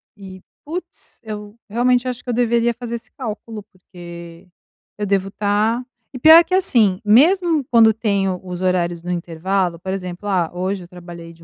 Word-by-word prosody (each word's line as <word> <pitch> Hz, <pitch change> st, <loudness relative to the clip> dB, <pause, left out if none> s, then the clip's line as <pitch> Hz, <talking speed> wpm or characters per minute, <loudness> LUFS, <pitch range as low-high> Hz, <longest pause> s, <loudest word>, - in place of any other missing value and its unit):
e 190 Hz, -2 st, -11 dB, 0.3 s
putz, 345 Hz, +5 st, -8 dB
eu 210 Hz, -1 st, -8 dB
realmente 245 Hz, +3 st, +1 dB
acho 250 Hz, -1 st, -4 dB
que -, -, -9 dB
eu 245 Hz, -, 0 dB
deveria 235 Hz, 0 st, +1 dB
fazer 235 Hz, 0 st, -6 dB
esse 230 Hz, -, -10 dB
cálculo, 225 Hz, -3 st, -7 dB
porque 175 Hz, -3 st, -13 dB, 0.5 s
eu 210 Hz, -, -2 dB
devo 195 Hz, -1 st, 0 dB
estar 210 Hz, +4 st, 0 dB, 0.3 s
e 255 Hz, -, -7 dB
pior 320 Hz, +5 st, +9 dB
que 365 Hz, -, -5 dB
assim, 220 Hz, -, +3 dB
mesmo 315 Hz, -, +4 dB
quando 225 Hz, -2 st, +6 dB
tenho 200 Hz, -4 st, -1 dB
os 180 Hz, 0 st, -7 dB
horários 175 Hz, -2 st, 0 dB
no 180 Hz, -, -4 dB
intervalo, 175 Hz, +1 st, -2 dB
por 190 Hz, +2 st, -5 dB
exemplo, 185 Hz, +1 st, -6 dB
"Ah, 180 Hz, -4 st, +1 dB
hoje 185 Hz, +1 st, -3 dB
eu -, -, -16 dB
trabalhei 175 Hz, -2 st, -11 dB
de 165 Hz, 0 st, -19 dB
205 Hz, 175 wpm, -20 LUFS, 180-235 Hz, 0.5 s, pior